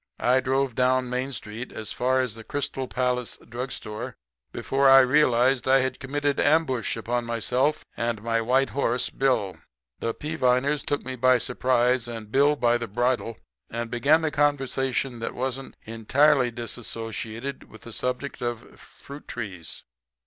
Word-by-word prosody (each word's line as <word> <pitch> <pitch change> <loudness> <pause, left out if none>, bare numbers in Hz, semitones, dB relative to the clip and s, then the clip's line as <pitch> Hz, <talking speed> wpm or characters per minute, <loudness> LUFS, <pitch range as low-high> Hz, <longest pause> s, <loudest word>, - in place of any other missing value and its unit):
I 125 +2 +4
drove 135 0 0
down 125 0 +1
Main 130 +2 -2
street 115 0 -7
as 110 - -6
far 130 +1 +1
as 125 -4 -3
the 115 0 -10
Crystal 135 0 -3
Palace 125 -1 -1
drugstore 115 -3 -5 0.4
before 135 0 +2
I 135 0 +9
realized 130 -2 +3
I 135 0 +5
had 130 0 -2
committed 145 +1 -1
ambush 145 -7 +2
upon 120 +2 -1
myself 125 +6 0
and 115 -2 -1
my 115 0 +1
white 130 +4 +2
horse 125 -3 0
Bill. 115 -10 0 0.4
"The 115 - -2
Peaviners 145 -1 +1
took 145 - -2
me 130 - -4
by 130 +1 +4
surprise 125 0 +1
and 115 -3 -7
Bill 145 +3 +4
by 120 -2 +2
the 120 - -4
bridle 120 0 -1 0.3
and 115 0 -4
began 150 +7 +3
a 155 - 0
conversation 135 -3 0
that 115 - -4
wasn't 130 +1 -4
entirely 125 +4 +3
disassociated 115 +2 -6
with 110 - -14
the 115 - -9
subject 125 +4 -3
of 120 -1 -5
fruit 140 +1 -12
trees. 90 -7 -6
125 Hz, 150 wpm, -25 LUFS, 115-135 Hz, 0.4 s, I